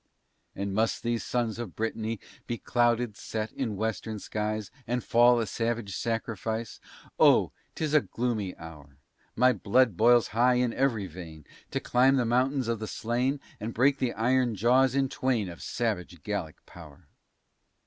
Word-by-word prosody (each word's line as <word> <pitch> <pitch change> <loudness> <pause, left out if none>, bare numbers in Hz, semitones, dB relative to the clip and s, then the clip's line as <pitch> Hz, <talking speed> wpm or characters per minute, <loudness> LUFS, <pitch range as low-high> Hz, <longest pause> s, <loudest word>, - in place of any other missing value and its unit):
And 100 0 -3
must 110 +2 0
these 115 -1 -1
sons 120 -2 -2
of 115 -7 -6
Brittany 110 0 -3 0.3
Be 120 - -2
clouded, 120 -2 +1
set 110 0 -4
in 115 -6 -3
western 110 +1 -3
skies, 105 0 -3 0.2
And 125 +1 -1
fall 120 +1 +5
a 115 - 0
savage 115 -1 -2
sacrifice? 115 -1 -3 0.4
Oh! - - +5 0.2
'tis 155 -2 -2
a 150 - +6
gloomy 115 -8 -3
hour! 75 -4 -12 0.4
My 125 +2 +5
blood 115 +1 +2
boils 120 +2 +5
high 125 +3 +3
in 125 -1 +1
every 120 -7 0
vein, 80 -3 -10 0.2
To - - -2
climb 130 +2 +3
the 125 -3 +2
mountains 130 +2 +1
of 115 -2 -1
the 110 - -5
slain, 125 +7 -1 0.2
And 110 +2 -5
break 135 +4 +3
the 125 -2 0
iron 120 +1 +1
jaws 125 +5 +3
in 135 -1 +2
twain, 125 -6 -1
Of 85 - -10
savage 90 - -3
Gallic 100 -7 -4
power. 80 -1 -14
115 Hz, 160 wpm, -28 LUFS, 105-125 Hz, 0.4 s, a